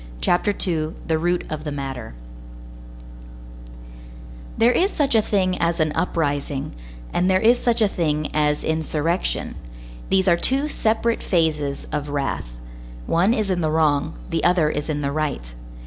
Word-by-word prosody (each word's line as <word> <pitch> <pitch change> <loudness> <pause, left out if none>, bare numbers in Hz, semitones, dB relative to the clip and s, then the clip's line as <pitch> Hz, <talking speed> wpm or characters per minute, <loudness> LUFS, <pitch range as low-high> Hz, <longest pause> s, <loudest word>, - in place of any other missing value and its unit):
CHAPTER 175 - +2
II—THE 160 -3 -2
ROOT 175 +2 0
OF 155 -1 -4
THE 150 - -4
MATTER 135 - -5 2.4
There 230 +2 +5
is 370 +9 +2
such 290 -9 0
a 220 - +5
thing 185 -3 0
as 170 +1 0
an 155 -1 +2
uprising, 145 -5 -1 0.4
and 180 +2 +2
there 185 0 +4
is 235 +4 +4
such 235 -2 +2
a - - +5
thing 155 -5 -1
as 150 -1 +1
insurrection; 160 +2 -1 0.6
these 190 0 +2
are 170 -2 +5
two 270 +10 +2
separate 230 -4 0
phases 155 -5 0
of 150 -1 -3
wrath; 140 - -2 0.6
one 180 +6 +3
is 215 -4 0
in 180 -1 0
the 155 - +1
wrong, 155 - +1 0.2
the - - 0
other 175 -4 +3
is 150 +2 -4
in 150 -1 -1
the 140 -1 -1
right. 140 - -3
160 Hz, 150 wpm, -22 LUFS, 150-190 Hz, 2.4 s, There